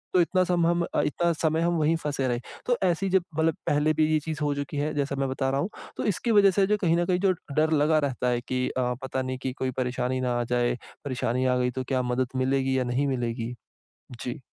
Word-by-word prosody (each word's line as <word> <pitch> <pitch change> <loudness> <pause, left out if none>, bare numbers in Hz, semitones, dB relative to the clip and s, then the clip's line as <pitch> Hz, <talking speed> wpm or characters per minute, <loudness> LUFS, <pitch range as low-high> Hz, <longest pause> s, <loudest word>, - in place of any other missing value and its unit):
तो - - +6
इतना 185 +2 +2
सम 175 -2 +2
हम 170 0 +2 0.2
इतना 170 +4 +1
समय 160 0 0
हम 170 +1 +2
वहीं 155 +1 +2
फंसे 140 -3 -1
रहे। 120 -1 0 0.3
तो 245 -1 +2
ऐसी 185 +1 +1
जब 190 -1 +3
मतलब 160 -1 +2
पहले 150 +1 +3
भी 155 0 +3
ये 155 - +3
चीज़ 155 0 -5
हो 145 -1 +1
चुकी 145 +1 -4
है, 150 +2 -1
जैसा 140 -1 -1
मैं 135 -1 0
बता 135 0 -1
रहा 135 +1 0
हूँ। 185 - -2 0.3
तो - - -2
इसकी 235 +6 -1
वज़ह 200 -2 +6
से 195 +1 +3
जो 210 +1 +2
कहीं 170 -3 +3
न 175 - +1
कहीं 180 0 +1
जो 195 0 +3 0.2
डर 155 +1 +3
लगा 155 +1 +3
रहता 135 -3 -1
है 120 -1 +1
कि 130 0 0
अ, 125 -1 -1
पता 130 0 -2
नहीं 130 0 -3
कि 130 - -1
कोई 130 -1 -2
परेशानी 125 0 -1
ना 125 -1 0
आ - - +1
जाए, 120 0 +2 0.3
परेशानी 130 -1 -1
आ 125 0 +2
गई 125 0 +1
तो 130 +1 -3
क्या 130 -2 +1
मदद 125 +1 0
मिलेगी 130 0 +1
या - - +1
नहीं 125 +3 0
मिलेगी। 120 -2 -2 0.7
जी। 125 - -4
140 Hz, 250 wpm, -26 LUFS, 130-165 Hz, 0.7 s, तो